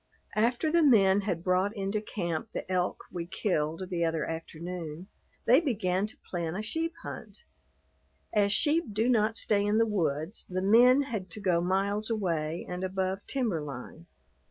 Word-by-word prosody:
After 240 +8 +2
the 340 +1 +4
men 205 -9 +5
had 180 -4 -2
brought 185 +4 +1
into 200 +2 -1
camp 170 -7 -3
the - - -4
elk 180 -1 0
we 170 -2 -5
killed 170 -3 -1
the 170 -1 0
other 165 -1 0
afternoon, 165 +1 -6 0.4
they 255 +7 +6
began 205 - 0
to - - -16
plan 170 -2 -3
a 210 - -3
sheep 325 +8 -2
hunt. 470 - -8 0.9
As 205 -1 +3
sheep 315 +8 +3
do 220 +3 +2
not 220 -3 +3
stay 205 -1 +2
in 205 +1 +2
the 225 - +4
woods, 165 -3 -2
the 185 0 -2
men 245 +7 +6
had 215 -9 -5
to 190 - -8
go 180 -4 +2
miles 200 +4 0
away 170 -7 -1
and 180 +1 -4
above 190 0 -1
timber 230 - -1
line. 150 +4 -8
195 Hz, 165 wpm, -29 LUFS, 170-220 Hz, 0.9 s, they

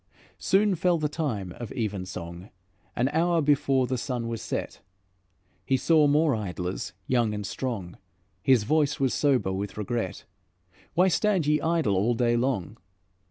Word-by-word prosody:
"Soon 200 +1 +3
fell 175 0 +2
the 155 -1 0
time 125 - -3
of 120 -3 -7
evensong. 90 -5 -5 0.5
An 125 - +1
hour 165 +3 +2
before 140 -3 +2
the 125 0 -2
sun 120 -2 -3
was 115 -1 -4
set, - - -4 0.8
He 130 +6 +1
saw 155 +2 +4
more 150 +1 +3
idlers, 95 -3 -4
young 115 -3 +1
and 105 -1 -4
strong; 100 -7 -4 0.4
His 130 -2 +4
voice 145 +4 +1
was 135 -3 +1
sober 130 -10 +2
with 100 +2 -4
regret: 105 -3 -3 0.7
'Why 180 +2 +5
stand 190 -2 +2
ye 150 +1 +2
idle 160 -11 +1
all 110 +6 +2
day 120 0 +2
long?' 120 -4 -1
125 Hz, 150 wpm, -27 LUFS, 105-150 Hz, 0.8 s, Why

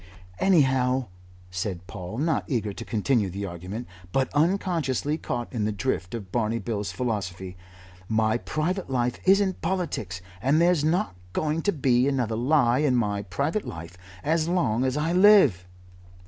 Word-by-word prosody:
"Anyhow," 130 - +3 0.4
said 90 -1 -4
Paul, 95 +1 -7
not 160 +4 0
eager 110 -7 -1
to - - -7
continue 110 -2 +1
the 100 +3 -4
argument, 95 +6 -6 0.3
but 135 +4 0
unconsciously 155 -4 +1
caught 120 +1 -4
in 115 -4 -1
the 110 - 0
drift 90 -2 -2
of 100 -5 -7
Barney 115 0 0
Bill's 105 -3 -3
philosophy, 95 -4 -3 0.5
"my 110 +1 +2
private 175 +7 -2
life 125 -2 0
isn't 190 0 +3
politics, 160 - -2 0.2
and 140 +7 +3
there's 170 -3 +3
not 155 - +1 0.2
going 155 +1 0
to 205 - +1
be 130 -5 +2
another 125 -5 0
lie 125 0 +3
in 145 -4 +2
my 105 -4 0
private 140 - -2
life 85 +1 -8 0.3
as 160 +1 +1
long 130 -9 +1
as 130 +2 0
I 160 +3 0
live." 180 - +6
125 Hz, 150 wpm, -26 LUFS, 105-155 Hz, 0.5 s, live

